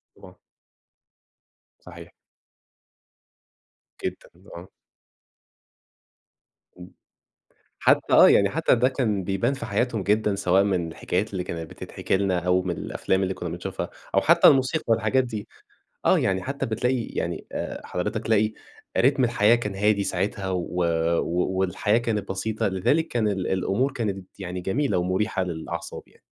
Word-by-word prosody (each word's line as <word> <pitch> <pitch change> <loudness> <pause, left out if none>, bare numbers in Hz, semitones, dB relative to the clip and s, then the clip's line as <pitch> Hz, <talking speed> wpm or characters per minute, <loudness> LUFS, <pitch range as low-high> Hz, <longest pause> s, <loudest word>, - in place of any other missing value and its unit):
طبعًا. - - -15 1.4
صحيح. - - -12 1.9
جدًا - - -5 0.3
آه. 85 +2 -9 2.1
امم، 90 - -11 0.9
حتى - - +2
آه، - - +9
يعني - - +4
حتى - - +2
ده 125 +2 +3
كان 110 -8 -1
بيبان 100 +8 0
في 130 - -6
حياتهم 110 +1 -1
جدًا، 105 +1 +1
سواء 95 -1 +3
من 90 -4 0
الحكايات 95 +5 -2
اللي 90 -2 -3
كانت 80 -2 -6
بتتحكي - - -3
لنا، 95 -2 0
أو 90 +1 +1
من 90 -2 -3
الأفلام 95 +1 -1
اللي 95 0 -1
كنّا 90 - -5
بنشوفها، 85 +2 -5 0.2
أو - - +5
حتى - - +6
الموسيقى 135 +4 +3
والحاجات 115 +3 +2
دي. 110 -4 -6 0.6
آه، - - +5
يعني 95 -1 0
حتى 140 +1 -3
بتلاقي 125 +3 0
يعني - - -4
آآ، - - -5
حضرتك 105 +5 -3
تلاقي 110 -1 +2 0.4
رِتم 135 +1 +3
الحياة 115 -1 +4
كان 105 -5 -4
هادي 105 0 +2
ساعتها 95 +1 -2
و 90 -1 -2 0.4
و 90 +2 -1
والحياة 95 +4 +1
كانت 110 -4 -2
بسيطة، 110 +3 -1
لذالك 120 - +1
كان 115 -3 0
ال 95 -3 -1
الأمور 100 +8 0
كانت 100 -6 -5
يعني 90 -1 -5
جميلة 100 +2 0
ومريحة 95 +3 0
للأعصاب 85 -1 -6
يعني. - - -26
100 Hz, 140 wpm, -25 LUFS, 90-115 Hz, 2.1 s, آه